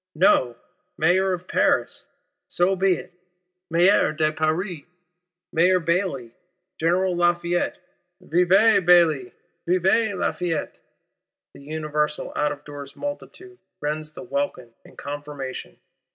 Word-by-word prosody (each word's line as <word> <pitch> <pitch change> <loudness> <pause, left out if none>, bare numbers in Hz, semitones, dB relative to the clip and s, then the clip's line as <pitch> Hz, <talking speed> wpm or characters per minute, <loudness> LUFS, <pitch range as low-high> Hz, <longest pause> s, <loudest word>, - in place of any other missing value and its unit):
No: 130 -7 +3 0.4
Mayor 185 +4 +2
of 180 0 -4
Paris! - - 0 0.4
So 180 +2 +1
be 190 -1 +2
it. 180 - -10 0.6
Maire 175 +3 +4
de 155 0 +1
Paris! 160 +2 -2 0.7
Mayor 180 +3 +4
Bailly, 165 -8 -1 0.5
General 180 +3 +1
Lafayette; 175 0 0 0.4
vive 185 +4 +3
Bailly, 165 -8 +4 0.4
vive 190 +4 +2
Lafayette—the 170 -5 -6
universal 150 0 -3
out 150 0 +1
of 145 0 -8
doors 140 -1 -9
multitude 365 +6 -8 0.2
rends 155 +1 -4
the 180 - -9
welkin 185 - -3
in - - -17
confirmation. 145 - -7
170 Hz, 105 wpm, -23 LUFS, 150-185 Hz, 0.7 s, Maire